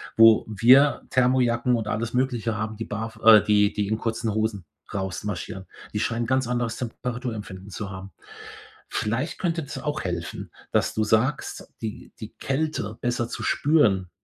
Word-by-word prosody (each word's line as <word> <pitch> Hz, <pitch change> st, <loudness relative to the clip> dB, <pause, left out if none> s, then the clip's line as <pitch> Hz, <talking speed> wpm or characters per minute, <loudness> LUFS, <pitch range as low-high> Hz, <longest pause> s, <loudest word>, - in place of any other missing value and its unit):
wo 115 Hz, -1 st, +7 dB
wir 125 Hz, +7 st, +5 dB
Thermojacken 125 Hz, -1 st, +2 dB
und 110 Hz, -3 st, -3 dB
alles 115 Hz, +2 st, -2 dB
Mögliche 125 Hz, -3 st, 0 dB
haben, 110 Hz, 0 st, -4 dB
die 115 Hz, -, -4 dB
barf 110 Hz, +2 st, -5 dB
äh, 110 Hz, -2 st, +9 dB
die 105 Hz, 0 st, +3 dB
die 105 Hz, -2 st, -1 dB
in 110 Hz, -, 0 dB
kurzen 115 Hz, -1 st, -2 dB
Hosen 110 Hz, -3 st, -1 dB, 0.3 s
rausmarschieren. 95 Hz, -1 st, -4 dB, 0.3 s
Die 105 Hz, -, -1 dB
scheinen 115 Hz, +1 st, -1 dB
'n -, -, -7 dB
ganz 130 Hz, 0 st, +1 dB
anderes 120 Hz, -2 st, -1 dB
Temperaturempfinden 115 Hz, -5 st, -5 dB
zu 100 Hz, +2 st, -5 dB
haben. 95 Hz, +1 st, -8 dB, 0.8 s
Vielleicht 120 Hz, +9 st, -2 dB
könnte 165 Hz, -2 st, -1 dB
das 140 Hz, -, -7 dB
auch 150 Hz, +1 st, -3 dB
helfen, 85 Hz, -2 st, -5 dB, 0.2 s
dass -, -, +2 dB
du 110 Hz, -, 0 dB
sagst, 115 Hz, +6 st, 0 dB
die 110 Hz, -2 st, -6 dB
die -, -, -8 dB
Kälte 135 Hz, -7 st, -2 dB
besser 120 Hz, -1 st, -1 dB
zu -, -, -5 dB
spüren, 105 Hz, -, +2 dB
115 Hz, 160 wpm, -25 LUFS, 105-125 Hz, 0.8 s, äh